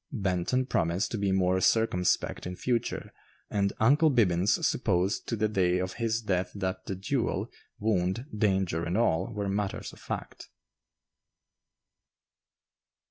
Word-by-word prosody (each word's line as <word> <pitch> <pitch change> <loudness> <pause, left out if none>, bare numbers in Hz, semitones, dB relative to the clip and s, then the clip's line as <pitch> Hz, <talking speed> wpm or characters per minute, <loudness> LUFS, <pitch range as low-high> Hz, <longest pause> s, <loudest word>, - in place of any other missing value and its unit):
Benton 100 +2 0
promised 90 -4 0
to 115 - -2
be 100 -1 +1
more 95 -1 +2
circumspect 90 -5 +1
in 90 - -5
future, 120 +4 -2 0.4
and 100 -1 +1
"Uncle 145 +8 +5
Bibbins" 100 - +2
supposed 90 +3 0
to 115 - -1
the 110 0 +1
day 90 -4 +2
of 90 0 -2
his 115 0 0
death 95 -3 0
that 95 -1 -3
the 95 - -2
duel, 95 - -1 0.3
wound, 100 +1 0
danger, 95 -5 +1
and 85 +3 -1
all, 95 -3 +1
were 105 -2 -3
matters 100 0 -2
of - - -14
fact. - - -6
95 Hz, 135 wpm, -29 LUFS, 90-110 Hz, 0.4 s, Uncle